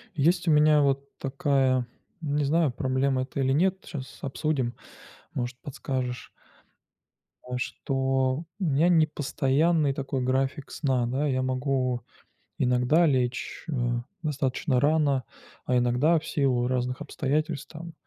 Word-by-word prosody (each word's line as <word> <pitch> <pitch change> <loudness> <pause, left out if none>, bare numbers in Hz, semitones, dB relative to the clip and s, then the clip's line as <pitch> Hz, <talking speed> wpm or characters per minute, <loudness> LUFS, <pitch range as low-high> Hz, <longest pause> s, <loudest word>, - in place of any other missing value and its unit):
Есть 170 +4 +2
у - - +5
меня 150 0 +5
вот 140 0 +1
такая, 135 -3 +1 0.4
не 145 -1 0
знаю, 155 0 +2
проблема 130 +1 0
это 140 - -6
или 135 -1 +2
нет, 190 +5 +1
щас 130 -5 -8
обсудим, 135 -3 -1 0.6
может 120 0 -3
подскажешь. 130 -3 -4 1.2
А 125 0 -3
что, 135 +2 -1 0.2
м, 185 - 0
у - - +2
меня 160 +6 +4
непостоянный 155 -1 +2
такой 135 -1 -3
график 130 +2 -1
сна, 130 -5 0
да, 135 +5 0
я 130 -2 +1
могу 130 -1 0 0.6
иногда 125 +6 +3
лечь, 125 -4 -1
э, - - -1 0.5
достаточно 135 -2 0
рано, 145 -2 +2 0.4
а 125 - +2
иногда 125 +7 +3
в 160 - -13
силу 125 -4 +1
разных 125 +1 -1
обстоятельств 150 +1 -2
там, 165 +1 -8
135 Hz, 130 wpm, -27 LUFS, 130-150 Hz, 1.2 s, у